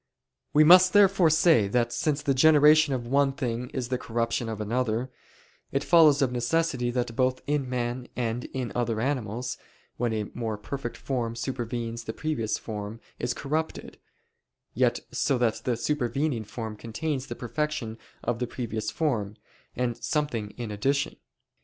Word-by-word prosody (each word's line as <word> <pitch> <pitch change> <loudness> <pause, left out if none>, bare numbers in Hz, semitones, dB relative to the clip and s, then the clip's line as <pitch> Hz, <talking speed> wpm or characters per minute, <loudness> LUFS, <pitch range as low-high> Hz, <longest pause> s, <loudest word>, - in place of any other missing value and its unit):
We 150 - +6
must 180 +3 +8
therefore 195 -4 +5
say 160 - +4
that 120 +3 +1
since 150 -1 0
the 140 -2 +2
generation 150 +1 +6
of 120 -2 -4
one 135 +2 +2
thing 125 -2 -3
is 125 -3 -4
the 125 -1 -1
corruption 115 0 -1
of 110 -2 -4
another, 115 +2 -1 0.6
it 135 +1 0
follows 155 -5 +6
of 130 - +1
necessity 125 +1 0
that 120 -1 -2
both 130 0 +1
in 145 -3 -1
men 125 0 -2
and 120 0 -2
in 130 -3 -4
other 120 -2 -1
animals, 125 -2 -2 0.4
when 120 -1 0
a 110 -1 -1
more 110 -3 -3
perfect 120 +4 -5
form 120 -4 -2
supervenes 120 -2 -4
the 110 - -4
previous 135 -8 -2
form 105 0 -6 0.2
is 120 0 -1
corrupted: 155 +3 -3 0.7
yet - - +2
so 135 - +1
that 120 -2 0
the 125 -2 0
supervening 135 -2 -1
form 110 0 -6
contains 130 +5 -3
the 120 - -5
perfection 125 -3 -3 0.2
of 120 -1 -1
the 125 - -1
previous 115 -3 -4
form, 110 -10 -1 0.4
and 120 -1 -1
something 145 -9 -1
in 120 -3 -5
addition. 135 +7 0
125 Hz, 155 wpm, -27 LUFS, 115-145 Hz, 0.7 s, must